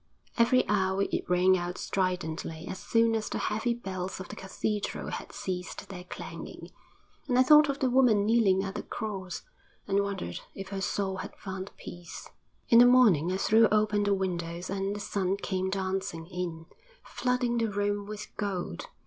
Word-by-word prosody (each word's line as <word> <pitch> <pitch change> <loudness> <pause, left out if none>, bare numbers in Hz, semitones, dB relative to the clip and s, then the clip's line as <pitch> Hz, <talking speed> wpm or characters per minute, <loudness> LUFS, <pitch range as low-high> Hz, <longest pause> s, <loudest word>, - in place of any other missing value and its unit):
Every 255 +2 +4
hour 190 -1 +2
it - - -3
rang 180 +1 +5
out 175 0 -3
stridently 170 -4 -2
as 185 - -5
soon 230 +2 +2
as 220 -1 -1
the - - -2
heavy 220 +3 0
bells 190 -5 -5
of 185 - -8
the - - -7
cathedral 205 +2 -3
had - - -6
ceased 180 -1 -5
their 180 -2 -8
clanging, - - -8 0.6
and 250 -3 +2
I 255 - +7
thought 300 +2 +7
of 280 - 0
the 265 - +1
woman 240 -6 +4
kneeling 210 -4 +3
at 195 -1 -4
the - - -4
cross, 195 -5 -5 0.4
and 200 0 +2
wondered 195 - -4 0.2
if 195 0 -7
her 195 -1 -4
soul 190 0 -1
had 185 - -7
found 190 0 -6
peace. 175 -1 -9 0.4
In 230 - +8
the 245 - +9
morning 210 - +5
I 185 - 0
threw 220 +3 +5
open 210 -1 +2
the 200 -1 +2
windows 175 -2 -3
and 195 +1 -1
the - - -5
sun 195 -1 -1
came 190 -1 -2
dancing 190 -3 -2
in, 170 -2 -5 0.4
flooding 250 -1 0
the 225 -1 +1
room 205 0 -1
with 210 0 -8
gold. 200 - -3
195 Hz, 175 wpm, -29 LUFS, 185-215 Hz, 0.6 s, the